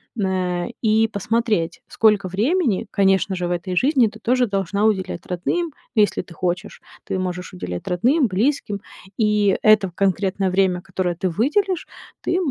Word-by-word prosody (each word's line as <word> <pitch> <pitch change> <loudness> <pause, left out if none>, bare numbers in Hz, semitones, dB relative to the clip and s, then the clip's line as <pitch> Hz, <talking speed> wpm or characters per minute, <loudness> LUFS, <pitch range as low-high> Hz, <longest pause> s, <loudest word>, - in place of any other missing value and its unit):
на 185 -4 -1
и 220 0 +3
посмотреть: 215 -4 -1
сколько 210 -4 +3
времени, 235 - +1
конечно 195 -1 +2
же, 180 -1 -2
в - - -3
этой 175 +1 -3
жизни 255 - +4
ты 220 +1 -10
тоже 250 +2 +2
должна 200 +1 0
уделять 190 -5 -1
родным, 295 - -2 0.2
если 210 -1 +3
ты 180 - -14
хочешь. 180 +1 -3 0.2
Ты 190 - -3
можешь 180 0 -4
уделять 90 - -6
родным, 250 - +2
близким, 210 0 -1 0.4
и 210 -3 +2
это 215 -3 +4
конкретное 190 0 0
время, 185 -1 +1
которое 180 -1 -2
ты 185 +2 -1
выделишь, 340 - 0 0.3
ты 350 - 0
195 Hz, 150 wpm, -21 LUFS, 180-225 Hz, 0.4 s, жизни